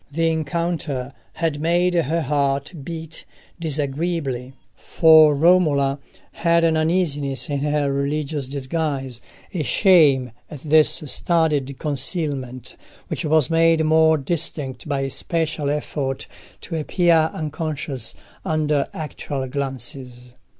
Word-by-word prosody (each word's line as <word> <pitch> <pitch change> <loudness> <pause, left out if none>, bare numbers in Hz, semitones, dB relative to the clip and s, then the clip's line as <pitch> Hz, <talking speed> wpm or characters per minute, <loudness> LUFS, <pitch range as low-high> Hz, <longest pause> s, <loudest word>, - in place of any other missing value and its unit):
The 165 +2 +1
encounter 155 -4 -2 0.2
had 160 -3 -2
made 175 +2 +2
her 165 -1 +1
heart 140 +1 0
beat 160 +1 -7 0.4
disagreeably, 145 -4 -2 0.2
for 155 -2 +5
Romola 145 -4 +3 0.3
had 170 0 +2
an 165 -1 +3
uneasiness 155 -4 0
in 140 - -1
her 145 -1 0
religious 140 0 -2
disguise, 135 -2 -3 0.3
a 175 - -1
shame 145 - +4 0.2
at 145 -4 -9
this 155 0 +3
studied 150 -3 0
concealment, 135 -3 -3 0.3
which - - -3
was 155 -1 +2
made 165 0 +4
more 160 0 +4
distinct 145 -3 -4
by 140 -2 0
a 135 - -2
special 160 -2 -2
effort 145 -2 -3 0.4
to 165 - -6
appear 165 0 +2
unconscious 150 -5 -4 0.3
under 150 -2 0
actual 145 -3 -4
glances. 130 -2 -6
150 Hz, 110 wpm, -22 LUFS, 135-165 Hz, 0.4 s, for